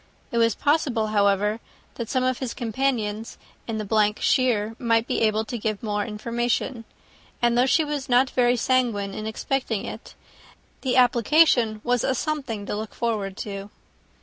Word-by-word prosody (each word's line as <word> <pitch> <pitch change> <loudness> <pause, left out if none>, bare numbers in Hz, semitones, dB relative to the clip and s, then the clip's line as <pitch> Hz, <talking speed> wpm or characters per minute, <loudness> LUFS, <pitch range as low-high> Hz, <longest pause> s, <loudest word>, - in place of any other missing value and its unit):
It 235 - 0
was 230 -2 +3
possible, 265 -7 +1
however, 205 +1 +2 0.3
that 235 -2 -6
some 255 -1 +1
of 255 -1 0
his 260 -3 -4
companions 225 -3 -2 0.3
in 225 -2 -3
the 210 0 +2
shire 225 -4 +1
might 230 -1 +2
be - - -1
able 220 0 +2
to 235 +1 -5
give 215 0 -3
more 210 -1 -1
information; 235 +2 -2 0.5
and 240 0 +2
though 250 +2 +4
she 320 +4 +3
was 290 -2 -4
not 250 +1 +4
very 245 -1 +3
sanguine 230 -6 +1
in 215 +2 -5
expecting 225 -1 -2
it, - - -9 0.7
the 260 -2 0
application 245 -2 +4
was 245 -1 +1
a 265 - +1
something 265 -8 -3
to - - -3
look 215 0 -6
forward 210 -5 -2
to. 200 -1 -6
230 Hz, 160 wpm, -24 LUFS, 215-255 Hz, 0.7 s, though